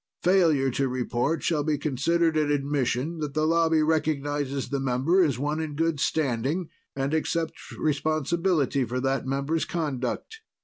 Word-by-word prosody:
Failure 165 Hz, -8 st, +3 dB
to 135 Hz, +2 st, 0 dB
report 130 Hz, +4 st, -1 dB
shall 155 Hz, -3 st, +1 dB
be 150 Hz, 0 st, 0 dB
considered 160 Hz, +4 st, +1 dB
an 150 Hz, -1 st, +2 dB
admission 145 Hz, +2 st, -1 dB
that 150 Hz, -2 st, -4 dB
the 155 Hz, 0 st, +2 dB
Lobby 165 Hz, -1 st, +3 dB
recognizes 145 Hz, -3 st, -1 dB
the 140 Hz, -, -1 dB
member 135 Hz, +8 st, +2 dB
as 140 Hz, -7 st, +1 dB
one 150 Hz, +4 st, -1 dB
in 155 Hz, -2 st, -4 dB
good 165 Hz, -1 st, 0 dB
standing 145 Hz, +4 st, 0 dB, 0.3 s
and 135 Hz, +2 st, -1 dB
accepts 160 Hz, +1 st, -2 dB
responsibility 155 Hz, 0 st, +1 dB
for 125 Hz, +2 st, -2 dB
that 135 Hz, 0 st, -1 dB
member's 140 Hz, +4 st, 0 dB
conduct. 155 Hz, -, -3 dB
150 Hz, 145 wpm, -26 LUFS, 135-160 Hz, 0.3 s, Failure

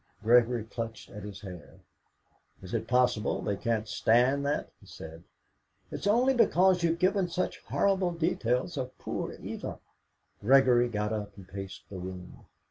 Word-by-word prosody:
Gregory 120 Hz, 0 st, +4 dB
clutched 115 Hz, 0 st, -6 dB
at 105 Hz, -, -8 dB
his 100 Hz, 0 st, -8 dB
hair. 90 Hz, -5 st, -10 dB, 0.9 s
"Is 95 Hz, -, -9 dB
it 110 Hz, -1 st, -1 dB
possible 125 Hz, -3 st, +2 dB
they 105 Hz, -, -1 dB
can't 110 Hz, +1 st, -1 dB
stand 125 Hz, +7 st, +3 dB
that?" 145 Hz, -, -2 dB
he -, -, -19 dB
said. 80 Hz, +1 st, -10 dB, 0.7 s
"It's -, -, -4 dB
only 245 Hz, +6 st, +4 dB
because 185 Hz, -6 st, +4 dB
you've 170 Hz, 0 st, +1 dB
given 185 Hz, +1 st, +2 dB
such 175 Hz, +1 st, -2 dB
horrible 195 Hz, -2 st, +1 dB
details 155 Hz, -3 st, -1 dB
of 130 Hz, -1 st, -4 dB
poor -, -, -4 dB
Eva." -, -, -6 dB, 0.6 s
Gregory 125 Hz, 0 st, +5 dB
got 105 Hz, -1 st, -2 dB
up 105 Hz, -2 st, -5 dB
and 95 Hz, -2 st, -12 dB
paced 95 Hz, 0 st, -8 dB
the 95 Hz, -, -8 dB
room. 90 Hz, 0 st, -9 dB
120 Hz, 150 wpm, -29 LUFS, 105-165 Hz, 0.9 s, Gregory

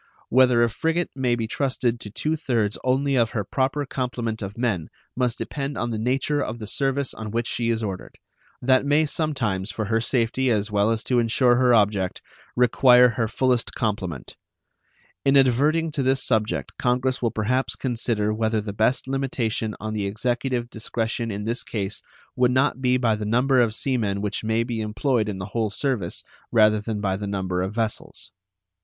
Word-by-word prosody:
Whether 125 Hz, -1 st, +5 dB
a 120 Hz, -, +3 dB
frigate 165 Hz, +7 st, -1 dB
may 125 Hz, -3 st, +1 dB
be 115 Hz, -1 st, -2 dB
trusted 125 Hz, -1 st, -1 dB
to 105 Hz, -, -6 dB
two 155 Hz, +9 st, -1 dB
thirds 115 Hz, -9 st, 0 dB
only 135 Hz, +2 st, +1 dB
of 115 Hz, -3 st, +3 dB
her 105 Hz, -, 0 dB
proper 135 Hz, +7 st, -1 dB
complement 120 Hz, -4 st, -3 dB
of 100 Hz, +1 st, -6 dB
men 110 Hz, -10 st, -1 dB, 0.3 s
must 125 Hz, -2 st, 0 dB
depend 140 Hz, 0 st, -4 dB
on 120 Hz, -, -2 dB
the 110 Hz, -, -2 dB
nature 135 Hz, +5 st, 0 dB
of 115 Hz, -2 st, -3 dB
the 110 Hz, -, -7 dB
service 135 Hz, +4 st, -1 dB
on 110 Hz, -1 st, -6 dB
which 115 Hz, +2 st, -1 dB
she 115 Hz, 0 st, -1 dB
is 115 Hz, -1 st, 0 dB
ordered; 95 Hz, -3 st, -6 dB, 0.5 s
that 130 Hz, +1 st, +4 dB
may 145 Hz, +2 st, +3 dB
sometimes, 130 Hz, -, -1 dB
for 110 Hz, -, -3 dB
her 115 Hz, +2 st, +1 dB
safety 125 Hz, +2 st, +1 dB
as 105 Hz, -2 st, 0 dB
well 105 Hz, +1 st, +2 dB
as 115 Hz, -1 st, 0 dB
to 125 Hz, -2 st, +1 dB
insure 120 Hz, +2 st, +3 dB
her 125 Hz, -1 st, +4 dB
object, 100 Hz, -4 st, +1 dB, 0.4 s
require 125 Hz, 0 st, +6 dB
her 115 Hz, 0 st, -1 dB
fullest 125 Hz, +1 st, 0 dB
complement. 95 Hz, -, -3 dB, 0.9 s
In 135 Hz, 0 st, +4 dB
adverting 145 Hz, +5 st, +3 dB
to 145 Hz, -, -2 dB
this 135 Hz, +1 st, +2 dB
subject 110 Hz, -3 st, -1 dB
Congress 125 Hz, +1 st, +1 dB
will 120 Hz, -, +2 dB
perhaps 120 Hz, +3 st, -1 dB
consider 115 Hz, -4 st, -1 dB
whether 110 Hz, 0 st, 0 dB
the 105 Hz, -1 st, -5 dB
best 110 Hz, +6 st, +1 dB
limitation 120 Hz, -5 st, -2 dB
on 110 Hz, 0 st, -4 dB
the 105 Hz, -2 st, -1 dB
Executive 120 Hz, +3 st, -1 dB
discretion 115 Hz, +1 st, -3 dB
in 105 Hz, -1 st, -4 dB
this 115 Hz, +2 st, -1 dB
case 100 Hz, -3 st, -4 dB, 0.3 s
would 125 Hz, -1 st, +3 dB
not 130 Hz, +1 st, +1 dB
be 125 Hz, -1 st, +3 dB
by 115 Hz, -4 st, +2 dB
the 105 Hz, -, -5 dB
number 125 Hz, +4 st, +3 dB
of 110 Hz, -2 st, +1 dB
sea 130 Hz, 0 st, 0 dB
men 100 Hz, -4 st, -1 dB
which 105 Hz, +1 st, -3 dB
may 110 Hz, +1 st, +1 dB
be 115 Hz, -2 st, -3 dB
employed 110 Hz, +1 st, 0 dB
in 100 Hz, -, -4 dB
the 95 Hz, -, -5 dB
whole 115 Hz, -2 st, 0 dB
service 105 Hz, -5 st, -2 dB, 0.3 s
rather 110 Hz, -1 st, +4 dB
than 105 Hz, -1 st, -4 dB
by 95 Hz, -2 st, 0 dB
the 100 Hz, +1 st, -5 dB
number 95 Hz, -2 st, -2 dB
of 95 Hz, +3 st, -3 dB
vessels. 110 Hz, -2 st, -3 dB
115 Hz, 185 wpm, -24 LUFS, 110-130 Hz, 0.9 s, require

